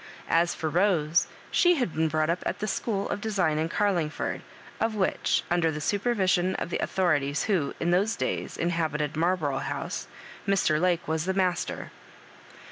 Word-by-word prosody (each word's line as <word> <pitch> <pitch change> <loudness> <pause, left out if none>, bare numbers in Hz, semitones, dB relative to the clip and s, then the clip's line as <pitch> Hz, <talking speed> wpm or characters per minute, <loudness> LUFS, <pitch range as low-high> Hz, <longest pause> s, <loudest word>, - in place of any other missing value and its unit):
As 170 +1 +3
for 160 - -3
Rose, 170 -1 +2 0.2
she 355 0 +5
had 245 - -1
been 160 0 +1
brought 155 +1 +1
up 175 - -2
at - - -2
the 210 - -3
school 205 -1 -1
of 205 - -2
design 185 -8 +1
in 160 +1 0
Oarlingford, 175 -6 0 0.4
of 225 -1 0
which, 195 -3 +1
under 175 -2 +3
the 150 -1 -3
supervision 190 0 +1
of 170 - -4
the - - -1
authorities 150 -6 +1
who, 180 -9 0
in 170 - +1
those 200 +6 +2
days, - - -3
inhabited 155 -3 -1
Marlborough 160 -5 +1
House, - - -4 0.4
Mr. 180 -6 +2
Lake 180 -1 +1
was 160 +1 -1
the 190 0 -1
master. 185 -2 -1
175 Hz, 165 wpm, -27 LUFS, 155-195 Hz, 0.4 s, she